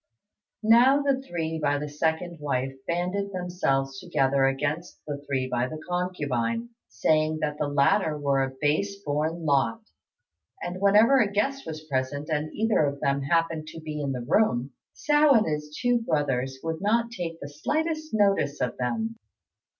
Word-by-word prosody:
Now 250 +6 +6
the 275 -2 +1
three 160 -8 -3
by 145 -1 +1
the 150 +1 -4
second 160 +3 -2
wife 135 -2 -1
banded 180 +4 -1
themselves 135 -8 -1
together 135 0 +1
against 145 +5 -2
the 145 -1 -5
three 130 -2 0
by 125 -1 0
the 155 +3 -7
concubine, 180 - -1 0.2
saying 155 +9 +1
that 150 -1 -2
the 150 - 0
latter 150 +3 +2
were 140 -2 +1
a 135 - 0
base 155 +7 +1
born 160 +2 -1
lot; 135 -6 +1 0.8
and 180 +2 -5
whenever 215 +7 +6
a 210 -5 +2
guest 270 +7 -1
was 155 -1 -6
present 140 +1 -2
and 155 0 -1
either 220 -6 +2
of 140 -1 -1
them 140 0 +1
happened 165 +1 0
to 160 - -8
be 155 -1 -5
in 140 -1 -1
the 125 -2 -4
room, 135 - +2 0.2
Hsiao 295 -1 +4
and 220 - +2
his 150 -1 -3
two 245 -1 +2
brothers 135 - -1
would 165 0 -3
not 230 +3 +1
take 170 -6 -5
the 140 - -7
slightest 310 - -2
notice 195 -9 +2
of 125 - -2
them. 225 - -2
155 Hz, 165 wpm, -26 LUFS, 140-200 Hz, 0.8 s, Now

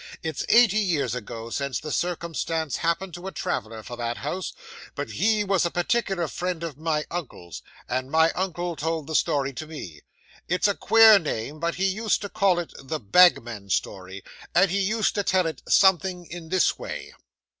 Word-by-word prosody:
It's 160 -3 -3
eighty 230 -3 +6
years 175 - 0
ago, 115 -1 -6
since 140 0 -2
the 150 - -6
circumstance 165 -3 -2
happened 170 +2 -1
to 175 +3 -7
a - - -4
traveller 110 - -4
for 120 - -7
that 120 0 -3
house, 175 +7 -4 0.4
but - - -4
he 215 -1 +2
was 195 -2 +1
a 170 - +1
particular 175 -1 0
friend 175 +2 -4
of 165 -5 -5
my 155 0 -1
uncle's; 125 - -6 0.3
and 130 +1 -2
my 160 +2 +4
uncle 175 -2 -3
told 160 0 -2
the 160 - -6
story 140 -2 +1
to 155 +4 -7
me. 90 - -9 0.5
It's 180 +4 +2
a 205 - +2
queer 220 0 +7
name; 150 -1 -4
but 170 +1 -1
he 190 - 0
used 215 +3 +1
to 205 - -5
call 195 -4 +2
it 175 -2 -4
THE 155 +3 -4
BAGMAN'S 115 - +3
STORY 95 0 -5 0.3
and 190 -2 +5
he 200 +1 +1
used 215 +3 +1
to 205 - 0
tell 185 -2 +2
it, 160 - -4
something 185 -1 +3
in 170 -1 -9
this 185 -1 +2
way. - - -7
170 Hz, 185 wpm, -25 LUFS, 140-190 Hz, 0.5 s, queer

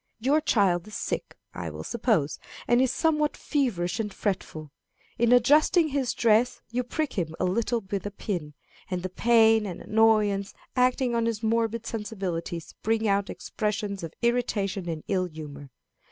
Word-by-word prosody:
Your 280 +7 +2
child 195 - +2
is 215 - -9
sick, - - -4 0.2
I - - -5
will - - -7
suppose, 215 - 0 0.3
and 240 +1 +4
is 260 -1 +2
somewhat 300 -1 +1
feverish 230 - -1
and 210 -2 -2
fretful. 180 -7 -3 0.5
In 235 0 +3
adjusting 300 +7 +5
his 270 -3 -1
dress 230 +1 +3
you 250 +1 0
prick 290 +4 -2
him 160 -2 -3
a 185 - +1
little 230 +5 0
with 195 0 -4
a - - -3
pin, 175 -7 -5 0.3
and 180 -2 -3
the 185 - -2
pain 225 +1 +4
and 180 - -6
annoyance 210 -2 +2 0.2
acting 250 0 +2
on 230 0 +1
his 225 -1 -2
morbid 230 0 0
sensibilities 190 -7 -4
bring 225 0 +1
out 200 0 +1
expressions 210 -2 -3
of 165 -1 -7
irritation 205 -6 0
and 160 -2 -4
ill 185 -2 +1
humor. 150 -4 -9
215 Hz, 160 wpm, -27 LUFS, 185-235 Hz, 0.5 s, adjusting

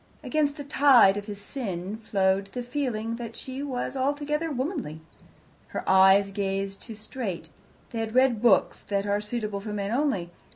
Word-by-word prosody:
Against 295 -2 0
the 290 - -5
tide 270 -8 +6
of 205 +1 -5
his 205 -1 -6
sin 200 -4 -5
flowed 195 -3 +1
the 250 - -3
feeling 240 -4 -2
that 230 -1 -7
she 260 +1 -6
was 265 -4 -3
not 265 -1 -1
altogether 295 +3 -1
womanly. 265 - -3 0.7
Her - - -6
eyes 190 +1 +6
gazed 195 0 -2
too 225 - -9
straight; 210 -6 -6 0.4
they 230 - -3
had 225 +1 -3
read 255 -4 +4
books 235 -5 +4
that 200 -1 -2
are 205 0 0
suitable 210 -2 -3
for 210 +1 -6
men 200 0 -2
only. 235 - 0
220 Hz, 170 wpm, -27 LUFS, 200-265 Hz, 0.7 s, tide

